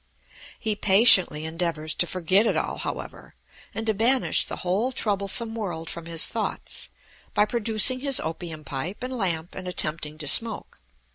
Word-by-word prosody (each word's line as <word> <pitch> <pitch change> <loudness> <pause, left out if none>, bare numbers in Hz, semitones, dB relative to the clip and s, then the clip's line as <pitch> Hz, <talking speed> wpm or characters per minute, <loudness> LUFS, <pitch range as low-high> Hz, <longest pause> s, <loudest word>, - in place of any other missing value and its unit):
He 215 -1 -1
patiently 190 -7 +4
endeavors 160 -2 -3
to 175 - 0
forget 185 +5 +2
it - - 0
all, - - -3
however, - - -7 0.4
and 225 - -5
to 220 - +2
banish 240 +5 +4
the - - -6
whole 205 +8 0
troublesome 210 0 0
world 175 -8 -5
from 170 -1 -7
his 165 0 +4
thoughts, - - -3 0.5
by 210 - +4
producing 225 +2 +3
his 275 0 0
opium 160 -1 -6
pipe 150 - -6
and 255 +1 -4
lamp 175 -6 -2
and 185 -1 -8
attempting 155 -3 -3
to 150 -2 -6
smoke. 225 +9 0
190 Hz, 155 wpm, -24 LUFS, 165-225 Hz, 0.5 s, patiently